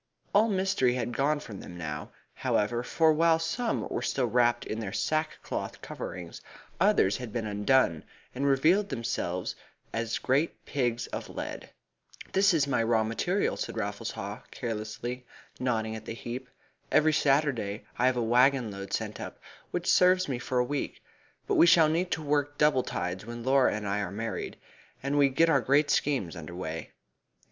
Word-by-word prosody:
All 215 +3 +5
mystery 190 - +2
had 120 -1 -2
gone 145 +3 +2
from 110 -9 -9
them 90 - -9
now, 80 -2 -5 0.2
however, 120 +3 0
for 160 +5 +3
while 165 +1 +4
some 165 +9 -1
were - - -3
still 130 - 0
wrapped 120 0 +2
in 110 - -4
their 105 -4 -4
sackcloth 155 +7 -2
coverings, 85 -2 -7 0.4
others 95 +2 +4
had 125 -3 -7
been 115 -1 -2
undone, 105 -4 +2 0.3
and 140 +2 -1
revealed 165 +9 +3
themselves 95 -8 -2 0.4
as 115 0 -1
great 140 +6 0
pigs 120 -3 -1
of - - -4
lead. - - -6 0.6
"There 190 - +3
is 170 -8 +4
my 140 -4 +1
raw 115 -1 +2
material," 175 - 0
said - - -4
Raffles - - -3
Haw - - -6
carelessly, 115 +2 -4 0.4
nodding 110 -3 -1
at 110 - -8
the 115 - -5
heap. 125 +2 -6 0.4
"Every 155 0 +4
Saturday 135 -8 +1
I 125 - +4
have 130 -1 +2
a 120 - +1
waggon 125 0 +3
load 100 0 -7
sent - - -3
up, - - -7 0.3
which - - -3
serves 185 0 +4
me 130 -4 -2
for 125 +1 -2
a 125 - +4
week, 145 +2 -4 0.4
but - - +1
we 170 - +7
shall 165 -2 +6
need 175 +3 0
to 160 - -3
work 145 0 0
double 150 -3 +4
tides 90 -3 -3
when 120 0 -6
Laura 135 +1 +4
and 105 -1 -4
I 100 +1 0
are 100 -3 -2
married, 115 +3 -4 0.5
and 140 +1 -1
we 140 -1 +5
get 150 +5 +3
our 140 -5 +4
great 145 +4 +3
schemes 130 - 0
under 80 +2 -8
way. 80 -2 -5
125 Hz, 175 wpm, -29 LUFS, 110-150 Hz, 0.6 s, we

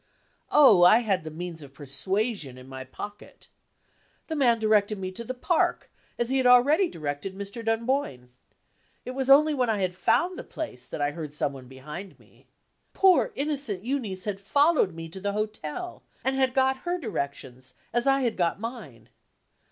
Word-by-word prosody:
Oh, 260 -11 +7
I 215 +7 +7
had 195 -7 0
the 155 - -6
means 165 +1 -7
of 140 -1 -13
persuasion 150 - -2
in 130 0 -13
my 130 0 -7
pocket! 205 +10 -10 0.8
The 320 - -4
man 245 -6 +3
directed 215 -1 +2
me 185 -1 -4
to 210 +5 -7
the 255 +3 -5
park, 325 +7 0 0.3
as 240 +1 -1
he 270 - +2
had 255 - +3
already 285 +9 +5
directed 150 - -5
Mr. 200 +4 -7
Dunboyne. 225 - -1 0.8
It 255 - -4
was 265 0 -3
only 300 +3 +7
when 255 -4 0
I 220 - +1
had 185 -2 -1
found 355 - +1
the - - -6
place, 125 - -7
that - - -6
I 145 0 +1
heard 150 -2 -7
some 145 -1 -1
one 130 -2 -11
behind 150 +9 -9
me. - - -24 0.5
Poor 385 +5 +4
innocent 275 -9 -2
Euneece 225 -9 -3
had 205 -2 -3
followed 280 - +3
me 165 0 -7
to 170 +4 -9
the 200 +1 -2
hotel, 215 - -4 0.2
and 265 0 +1
had 265 -1 +1
got 265 0 +3
her 350 +5 -2
directions, 140 - -5 0.2
as 240 +2 +1
I 270 0 +4
had 240 -4 0
got 175 0 0
mine. 220 - -8
210 Hz, 180 wpm, -26 LUFS, 160-265 Hz, 0.8 s, Oh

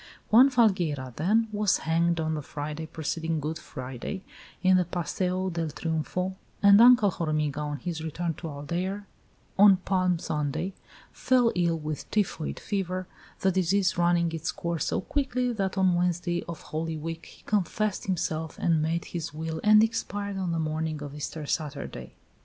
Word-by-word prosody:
Juan 250 +5 +8
Falgueira, 175 - +1
then, 215 +8 +2
was 210 -2 +2
hanged 170 +1 +2
on 160 0 0
the 155 - -2
Friday 150 +2 -5
preceding 160 +1 -2
Good 155 +2 -3
Friday, 130 +9 -6 0.4
in 185 0 +6
the 180 - +3
Paseo 180 +2 -2
del 165 -1 -2
Triumfo, 165 +4 -2 0.3
and 200 +1 +8
Uncle 240 -4 +7
Hormiga, 155 -4 -1
on 150 -1 -3
his 160 +3 -4
return 165 +1 -2
to 165 - -6
Aldeire, 175 +7 -3 0.5
on 200 -1 +8
Palm 185 -1 +1
Sunday, 155 +4 -2 0.4
fell 250 -3 +3
ill 170 -2 +1
with 155 -1 -5
typhoid 195 -7 -1
fever, 185 -2 -2 0.4
the 190 - +3
disease 185 +1 +2
running 170 -1 +2
its 165 -1 -2
course 170 -1 -2
so - - 0
quickly 255 +1 -1
that 195 -3 -2
on 190 -1 +4
Wednesday 175 0 0
of 170 - -6
Holy 160 +1 -3
Week 165 +2 -6
he - - -16
confessed 210 0 -1
himself 160 -3 -2
and 165 -2 +2
made 165 +2 -1
his 165 -3 -4
will 160 0 -4
and 215 0 +7
expired 205 -2 -2
on 180 -2 -1
the 165 - -1
morning 155 -1 -2
of 145 -1 -7
Easter 150 +1 -5
Saturday. 145 -1 -4
170 Hz, 160 wpm, -27 LUFS, 155-190 Hz, 0.5 s, Juan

